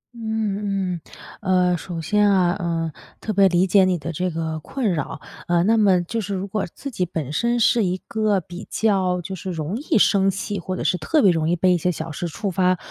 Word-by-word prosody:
嗯， 205 -5 -2 0.4
嗯， 185 -2 +2
呃， - - +2
首 175 0 -6
先 210 +5 +2
啊， 180 -2 +3
嗯， 165 -2 -1 0.3
特 215 - -3
别 195 0 +5
理 180 +1 +3
解 190 +1 +5
你 185 -1 +2
的 165 +1 -5
这 180 +3 -1
个 160 -1 -3
困 220 - -2
扰， 155 0 -4 0.3
呃， 175 0 +3
那 220 +4 +3
么 195 -5 +4
就 225 +6 -3
是 200 0 -3
如 190 +1 -3
果 205 +1 -2
自 280 - -7
己 190 - -1
本 160 -5 -4
身 235 +7 +1
是 230 0 +4
一 185 -1 0
个 215 -3 +1
比 175 +3 -10
较 190 -4 +1
就 185 +3 -7
是 190 0 -6
容 160 +2 -3
易 295 +4 0
生 195 -1 +4
气， 200 +1 -3
或 185 +1 -4
者 - - -3
是 180 - +1
特 290 - +2
别 195 - +6
容 160 -2 0
易 175 - +2
被 180 +1 +3
一 175 - +1
些 180 +3 +1
小 160 -1 -5
事 175 +3 -4
触 195 +5 -4
发 185 0 +2
185 Hz, 245 characters per minute, -22 LUFS, 175-205 Hz, 0.4 s, 别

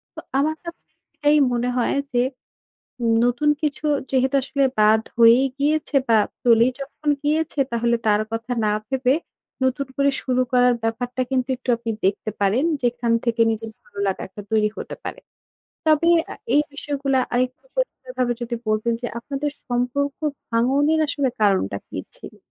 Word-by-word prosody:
তো - - -6 0.2
আমার 310 +3 +1
কাছে 340 0 -9 0.3
এটাই 295 +1 +3 0.2
মনে 245 +1 0
হয় 245 - +1 0.2
যে, 245 - +3 1.0
নতুন 245 +5 +2
কিছু 300 0 -1 0.2
যেহেতু 265 0 +1
আসলে 275 +1 0 0.2
বাদ 215 +1 +5
হয়েই 235 +3 +6
গিয়েছে 300 +1 +1
বা 225 -1 +5 0.3
চলেই 235 0 +5
যখন 290 +2 -6
গিয়েছে। 305 0 0
তাহলে 235 0 +2
তার 210 0 +4
কথা 225 +2 -3
না 210 - +2 0.2
ভেবে 265 -1 +2 0.5
নতুন 260 +1 0
করে 280 0 +3
শুরু 255 -1 +1
করার 250 -1 +5
ব্যাপারটা 245 +3 -2
কিন্তু 260 0 0
একটু 250 - -18
আপনি 230 0 -5 0.2
দেখতে 205 +2 -1
পারেন। 205 +8 +2 0.2
যেখান 240 -1 0
থেকে 235 -1 0
নিজের 225 0 -4
ভালো 200 - -15
লাগা 190 - -1
একটা 205 +2 -10
তৈরি 215 -1 +3
হতে - - -6
পারে। - - -6 0.7
তবে 310 +2 +4 0.2
আ - - -6 0.2
এই 295 - +5
বিষয়গুলা 280 -2 -1 0.2
আরেকটু 255 - -1
পরিষ্কার - - -3
ভাবে 245 -1 +2
যদি 240 0 -3
বলতেন 215 +2 +1
যে, 240 - -1
আপনাদের 285 +4 -3 0.2
সম্পর্ক 250 +3 -1 0.3
ভাঙনের 275 +7 +2
আসলে 285 -2 0
কারণটা 190 - +2
কি - - -6 0.2
ছিল? - - -12
250 Hz, 155 wpm, -22 LUFS, 230-280 Hz, 1.0 s, হয়েই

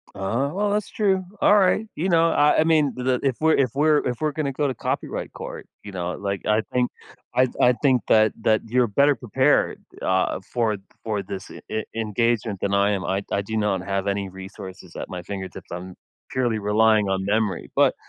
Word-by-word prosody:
Uh, 115 +9 -1
well, 205 +2 0
that's 210 0 -1
true. 195 -3 +1 0.2
Alright. 205 +1 +4
You 170 - -1
know, 165 -2 +4
I 150 -2 +4
I - - +5
mean, 155 -3 +3
the 125 0 0
if 135 -3 +1
we're 160 0 +4
if 130 -4 +2
we're 150 +2 +4
if 125 -2 -3
we're 155 -1 +1
gonna 145 -2 -2
go 145 +2 0
to 130 - -2
copyright - - -3
court, - - -7 0.2
you 105 - -8
know, 90 -2 -3
like, 100 -1 -4
I 105 +1 +3
think 125 -1 +1 0.4
I 130 +1 +4
I 125 - +5
think 130 -4 +3
that 110 0 +5
that 110 0 +3
you're 125 +2 +3
better 140 +7 +3
prepared, 120 -6 +1 0.2
uh, - - +1
for 115 -4 +1 0.3
for 105 -3 -2
this 95 0 -7
e 110 - -5
engagement 110 -1 0
than 100 0 +1
I 100 +1 +3
am. 100 -2 -1
I 95 +1 -1
I 100 - +1
do 110 +3 -4
not 105 -3 0
have 100 0 -2
any 100 -1 -1
resources 95 -1 -10
at - - -6
my 90 -2 -6
fingertips. 95 -1 -7
I'm 90 +1 -7 0.3
purely 120 -4 0
relying 105 0 +3
on 95 0 -1
memory. 105 0 -1
But - - +4
110 Hz, 200 wpm, -23 LUFS, 100-140 Hz, 0.4 s, I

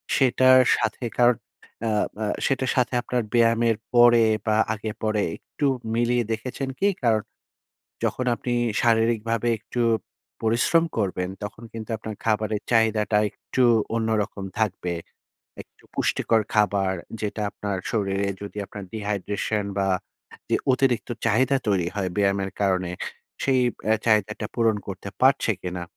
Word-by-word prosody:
সেটার 130 0 +5 0.2
সাথেকার 120 +1 +2 0.6
আ - - +1 0.3
আ - - 0 0.2
সেটার 130 -1 +1
সাথে 125 -1 +1
আপনার 125 0 -1
ব্যায়ামের 115 -1 +3 0.2
পরে 120 -1 +7 0.2
বা, 110 -1 +2 0.2
আগে 110 0 -4
পরে 110 -1 +1 0.2
একটু 145 - -5 0.3
মিলিয়ে 120 +1 +2
দেখেছেন 125 +4 -3
কি? 200 - +3
কারন, 115 -4 +3 0.8
যখন 125 - -1
আপনি 120 +2 -4 0.3
শারীরিকভাবে 115 0 +2
একটু 120 - -5 0.6
পরিশ্রম 120 +9 +3
করবেন, 90 -3 -1
তখন 105 +3 -7
কিন্তু 110 -1 -7
আপনার 110 0 -7
খাবারের 110 -1 0
চাহিদাটা 110 -2 +3
একটু 130 - -2 0.3
অন্যরকম 110 -3 -1 0.2
থাকবে। 95 -4 -1 0.7
একটু - - -23
পুষ্টিকর 115 -1 +2
খাবার 100 -3 +2 0.3
যেটা 105 0 -3
আপনার 100 -2 -3
শরীরে 100 -2 0
যদি 100 0 -8
আপনার 100 0 -8
dehydration 105 0 -2
বা, 95 -1 +1 0.6
যে - - +3 0.2
অতিরিক্ত 130 -2 +1 0.2
চাহিদা 130 +5 +3
তৈরি 95 -4 +2
হয় 95 -2 -1
ব্যায়ামের 100 -1 +1
কারণে, 95 -3 +1 0.5
সেই 130 -1 +3 0.2
বে 110 - +1
চাহিদাটা 105 -1 +2
পূরণ 115 -2 +3
করতে 100 +1 -6
পারছে 130 -3 +4
কিনা, 90 -1 -4
110 Hz, 125 wpm, -24 LUFS, 100-120 Hz, 0.8 s, পরে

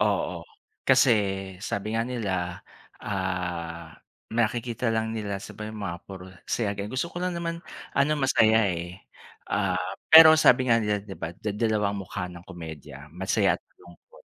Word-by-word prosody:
Oo. - - 0 0.4
Kasi 135 0 +5 0.5
sabi 105 +1 -3
nga 115 - +1
nila, 95 -8 -3 0.4
ah, 90 -4 -4 0.4
nakikita 115 +1 -1
lang 110 0 0
nila 105 -2 -3
sa - - -9
ba 105 - -6
yung 110 -1 -7
mga 85 -3 -4
puro 95 -1 -9 0.2
saya 110 -4 0
din, 100 0 -4
gusto 130 +9 -3
ko 175 - -6
lang 180 -1 -1
naman 170 0 -3 0.4
ano, 140 +2 +3
masaya, 110 -5 +4
eh. 85 +1 -5 0.5
Ah, 100 -2 +1 0.3
pero 160 0 +10
sabi 130 -4 +5
nga 115 - +6
nila 105 -2 -1
'di 100 -2 -9
ba, 85 +1 -5
da 105 +3 -4
dalawa 105 -1 0
ang 100 - -4
mukha 90 -2 -5
ng 90 0 -11
komedya, 75 -5 -10
masaya't 95 +1 +1 0.2
malungkot. 85 0 -19
105 Hz, 160 wpm, -26 LUFS, 90-115 Hz, 0.5 s, pero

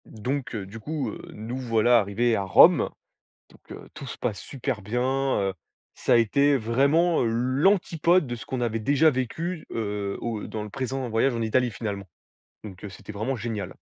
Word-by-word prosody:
Donc, 125 +4 -4
heu, 100 -3 -4
du 100 +4 -10
coup, 135 0 -3
heu, - - -9
nous 115 +4 -6
voilà 120 -1 +3
arrivés 115 +3 +1
à 100 - 0
Rome! 95 - +6 0.6
Donc, - - -20
heu, - - -10
tout 140 - -8
se - - -7
passe 110 -5 -2
super 130 -5 -4
bien, 115 +5 -1 0.4
heu. 95 -1 -1 0.4
Ça - - 0
a - - +7
été, 140 +5 +3
vraiment, 140 +9 +2
l'antipode 155 - +2
de 120 -1 -4
ce 110 - -9
qu'on 130 - -3
avait 115 -2 -1
déjà 145 +7 +4
vécu, 155 +6 -3
heu, 105 -3 -3
au 115 -3 -4
dans 110 - -5
le 105 - -7
présent 130 +1 -3
voyage 115 +3 +1
en 115 - -2
Italie, 125 +3 +1
finalement. 100 -2 -5 0.6
Donc, 95 -4 -10
heu, 105 - -5
c'était 95 - -10
vraiment 110 +6 -2
génial! 110 -5 -5
120 Hz, 185 wpm, -25 LUFS, 105-135 Hz, 0.6 s, a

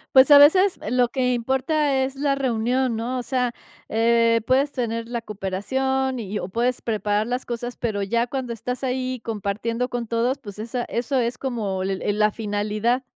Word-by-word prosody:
Pues, 265 +2 +7
a 285 - +11
veces 370 +7 +6
lo 250 -1 +3
que 250 -1 0
importa 265 +3 +1
es 270 +1 -6
la 280 0 +1
reunión, 250 -1 0
¿no?, 240 +3 -2
o - - -1
sea, 250 -1 0 0.4
eh, 230 +1 +3
puedes 275 +2 +3
tener 230 -2 -3
la 240 -1 -2
cooperación 255 +6 -2
y 210 -1 -4
o - - -4
puedes 240 +5 -1
preparar 210 -1 0
las 250 +1 -2
cosas, 240 0 -4
pero 210 -4 -2
ya 235 +4 +1
cuando 250 -2 -4
estás 250 +4 -4
ahí 255 0 -2
compartiendo 225 +3 -2
con 240 -2 -3
todos, 235 +4 0
pues, 205 -7 -10
esa 235 +3 -3
eso 250 +3 -1
es 240 +1 -1
como 215 -8 -2
el 190 0 -2 0.2
la 210 0 +3
finalidad. 215 +4 -1
240 Hz, 180 wpm, -23 LUFS, 220-260 Hz, 0.4 s, a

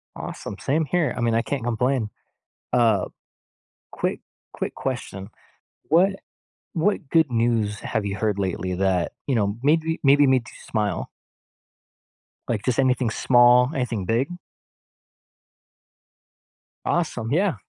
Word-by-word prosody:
Awesome. 100 - -7
Same 155 +3 0
here. 160 -3 0
I - - -2
mean, 115 -1 +2
I 115 - +3
can't 135 -1 -3
complain. 120 -1 0 0.6
Uh, 115 -4 +3 0.8
quick - - -2 0.3
quick - - -4
question. 105 -7 -5 0.6
What 190 +4 +3 0.6
what 175 -2 0
good 160 -2 +3
news 115 -3 0
have 110 - -2
you 100 0 -2
heard 105 0 -1
lately 95 -1 -2
that, 95 -1 0
you 135 - +1
know, 100 -2 0
made 155 +4 +3
we 160 0 -1
maybe 140 +1 +6
made 130 -2 +3
you - - -13
smile? 105 -2 -1 1.4
Like, 110 -3 -1
just 125 -3 +1
anything 130 -3 +2
small, 125 +2 +5
anything 120 -8 -2
big? 120 - 0 2.5
Awesome, 125 -9 -1
yeah! 185 +2 +2
120 Hz, 125 wpm, -24 LUFS, 105-140 Hz, 2.5 s, maybe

